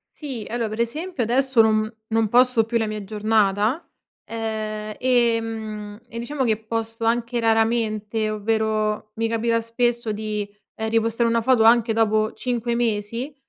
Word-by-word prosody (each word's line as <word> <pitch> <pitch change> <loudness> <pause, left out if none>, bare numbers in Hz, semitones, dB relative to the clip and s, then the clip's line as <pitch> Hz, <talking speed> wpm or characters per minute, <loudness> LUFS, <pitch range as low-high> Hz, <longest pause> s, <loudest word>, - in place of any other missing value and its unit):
Sì. 265 -8 -6
Allora 235 -1 -1
per 215 +1 -6
esempio 300 +4 -2
adesso 255 +1 +3
non 215 0 +2 0.2
non 225 0 +1
posto 250 0 +5
più 235 +1 0
la 225 -1 0
mia 215 -1 -4
giornata, 215 - +1 0.4
uhm 220 -1 -3 0.2
e 240 -3 +3
mhmm, 215 -2 -6
e 230 - -6
diciamo 265 +3 -2
che 220 -3 +2
posto 225 0 -3
anche 235 +1 0
raramente, 225 -1 +1
ovvero 215 0 -1
mi 225 +1 0
capita 230 0 +1
spesso 235 0 -1
di, 210 -1 -3 0.3
ehm, 220 0 -3
repostare 230 +1 +1
una 230 0 +2
foto 245 -1 +3
anche 230 0 +5
dopo 215 -1 +2
5 240 -1 -2
mesi, 230 +3 -2
225 Hz, 150 wpm, -23 LUFS, 215-235 Hz, 0.4 s, posto